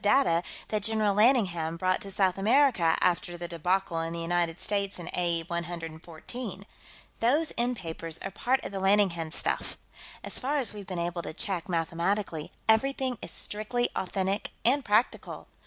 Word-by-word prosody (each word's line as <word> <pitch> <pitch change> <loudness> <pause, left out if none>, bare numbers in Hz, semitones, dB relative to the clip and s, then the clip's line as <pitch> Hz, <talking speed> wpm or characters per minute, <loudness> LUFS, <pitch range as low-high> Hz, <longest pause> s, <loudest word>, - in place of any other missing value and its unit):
data 205 -6 +4 0.3
that 215 -1 0
General 215 -1 +2
Lanningham 190 -9 +3
brought 185 +1 +1
to 200 - -7
South 190 -1 +2
America 220 - +4
after 175 0 +1
the 175 0 -5
debacle 175 +1 0
in 165 0 -3
the 170 - -4
United 170 0 0
States 200 -2 -1
in 175 -2 -8
A.E. 170 -2 0
114. 170 +5 -5 0.5
Those 295 +7 +2
end 245 +1 +1
papers 165 -2 -5
are 195 - -4
part 255 +7 0
of - - -4
the 195 - -3
Lanningham 190 -5 +3
stuff. - - +1 0.5
As - - -1
far 285 +3 0
as 250 -7 +1
we've 205 -3 -8
been 185 - -4
able 170 0 -2
to 165 - -6
check 185 -2 -1
mathematically, 170 0 -1 0.2
everything 255 +2 +2
is - - -5
strictly 240 +4 -2
authentic 190 +2 -1 0.2
and 270 +4 +4
practical. 215 +2 0
190 Hz, 160 wpm, -29 LUFS, 170-220 Hz, 0.5 s, data